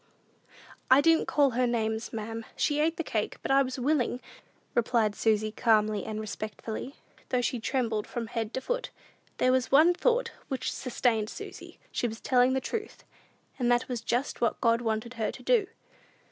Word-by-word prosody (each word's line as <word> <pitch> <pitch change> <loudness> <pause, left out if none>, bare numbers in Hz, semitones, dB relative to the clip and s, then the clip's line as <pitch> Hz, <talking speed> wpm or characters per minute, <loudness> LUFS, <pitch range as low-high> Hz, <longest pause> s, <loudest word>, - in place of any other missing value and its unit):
"I 260 +1 +8
didn't 325 +2 +4
call 285 -3 +3
her 250 +1 +1
names, 220 -1 -1
ma'am; 225 +1 -5
she 295 -1 +1
ate 320 +2 +1
the 330 - -1
cake, 215 -8 -2
but - - -1
I 275 0 +6
was 260 -1 -2
willing," 255 -2 +1 0.5
replied 230 -3 +2
Susy, 215 0 +1
calmly 215 -3 +2
and 215 -1 -4
respectfully, 215 +4 -5 0.3
though 250 -1 +1
she 245 - -1
trembled 225 -3 -1
from 235 -1 -4
head 225 -1 -3
to 260 - -2
foot. - - -2 0.5
There 255 - +3
was 255 0 +1
one 315 +6 +7
thought 475 +5 +1 0.2
which 265 -2 -2
sustained 235 -4 0
Susy; - - -9
she 240 - 0
was 225 0 -7
telling 255 0 +3
the 265 - +2
truth, 440 - -5 0.6
and 245 -1 +2
that 240 +1 +2
was 245 -3 -3
just 245 +4 -2
what 235 - +1
God 230 0 +3
wanted 225 +1 -2
her 225 -3 -2
to - - -12
do. 460 -6 +3
245 Hz, 175 wpm, -29 LUFS, 220-270 Hz, 0.6 s, I